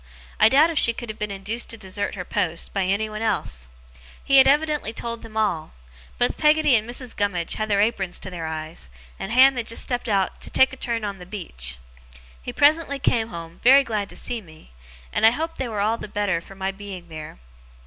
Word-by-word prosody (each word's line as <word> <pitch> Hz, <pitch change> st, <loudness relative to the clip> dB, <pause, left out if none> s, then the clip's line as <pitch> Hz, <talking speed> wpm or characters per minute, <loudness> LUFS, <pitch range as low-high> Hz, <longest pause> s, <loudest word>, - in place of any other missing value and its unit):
I -, -, +7 dB
doubt 300 Hz, +6 st, +5 dB
if 320 Hz, -, +1 dB
she 235 Hz, -, +5 dB
could 240 Hz, 0 st, -7 dB
have 215 Hz, -, -14 dB
been 210 Hz, -, -2 dB
induced 200 Hz, +4 st, -3 dB
to 230 Hz, -, -2 dB
desert 200 Hz, 0 st, -4 dB
her 180 Hz, -2 st, -6 dB
post, 165 Hz, -1 st, -2 dB
by 195 Hz, -2 st, 0 dB
anyone 215 Hz, +3 st, -1 dB
else. 75 Hz, -, -2 dB, 0.5 s
He 275 Hz, -, +4 dB
had 265 Hz, -, +8 dB
evidently 295 Hz, -4 st, +2 dB
told 230 Hz, 0 st, -5 dB
them 220 Hz, -1 st, -10 dB
all. 170 Hz, -8 st, -1 dB, 0.4 s
Both -, -, 0 dB
Peggotty 300 Hz, -3 st, +4 dB
and 220 Hz, +1 st, 0 dB
Mrs. 245 Hz, 0 st, -5 dB
Gummidge 190 Hz, -5 st, 0 dB
had 215 Hz, 0 st, -3 dB
their 200 Hz, -1 st, +3 dB
aprons 195 Hz, -5 st, 0 dB
to 190 Hz, -, -5 dB
their 165 Hz, -3 st, -5 dB
eyes, 155 Hz, -, -6 dB, 0.3 s
and 195 Hz, -, -5 dB
Ham 260 Hz, +2 st, +6 dB
had 235 Hz, -1 st, -3 dB
just 230 Hz, -, 0 dB
stepped 245 Hz, -1 st, -3 dB
out 195 Hz, -2 st, 0 dB
'to -, -, -3 dB
take 265 Hz, 0 st, +4 dB
a -, -, -5 dB
turn 235 Hz, -4 st, -2 dB
on 200 Hz, -2 st, -5 dB
the 180 Hz, -, -11 dB
beach'. 65 Hz, -, -4 dB, 0.6 s
He -, -, -5 dB
presently 290 Hz, -1 st, +3 dB
came 230 Hz, -4 st, +1 dB
home, 170 Hz, -4 st, -9 dB
very 270 Hz, +3 st, +7 dB
glad 210 Hz, -5 st, -3 dB
to -, -, -11 dB
see 240 Hz, -2 st, -4 dB
me; 155 Hz, -, -17 dB, 0.4 s
and -, -, -1 dB
I 220 Hz, -, +9 dB
hope 320 Hz, +7 st, -4 dB
they 260 Hz, -, -1 dB
were 210 Hz, -2 st, -2 dB
all 220 Hz, +3 st, +1 dB
the -, -, -6 dB
better 205 Hz, -5 st, -1 dB
for 195 Hz, -, -14 dB
my 190 Hz, 0 st, -2 dB
being 195 Hz, -3 st, -9 dB
there. 155 Hz, -, -8 dB
215 Hz, 220 wpm, -23 LUFS, 185-245 Hz, 0.6 s, I